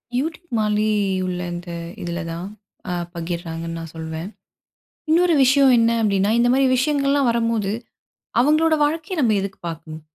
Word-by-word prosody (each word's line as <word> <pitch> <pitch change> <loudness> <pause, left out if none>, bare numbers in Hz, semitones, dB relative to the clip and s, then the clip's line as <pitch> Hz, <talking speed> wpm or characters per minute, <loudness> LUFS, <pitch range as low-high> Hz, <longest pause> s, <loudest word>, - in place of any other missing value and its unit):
YouTube 320 +6 -2
மாரி 210 0 +1 0.4
உள்ள 180 -1 -3
இந்த 175 0 -7 0.3
இதில 170 0 -4
தான் 170 +2 -5 0.4
அ - - -1 0.2
பகிர்றாங்கன்னு 165 -1 -4
நான் 165 -1 -8
சொல்வேன். 160 +3 -5 0.8
இன்னொரு 345 +1 +4
விஷயம் 270 0 +5
என்ன 230 0 +4
அப்டின்னா, 200 -1 +2
இந்த 240 +1 +3
மாரி 270 0 +3
விஷயங்கள்லாம் 280 -1 +2
வரும்போது, 230 -4 0 0.7
அவங்களோட 310 +4 +4
வாழ்க்கைய 320 +4 -1
நம்ம 225 -4 +3
எதுக்கு 195 0 -6
பார்க்கணும்? 160 -1 -7
215 Hz, 135 wpm, -21 LUFS, 170-280 Hz, 0.8 s, விஷயம்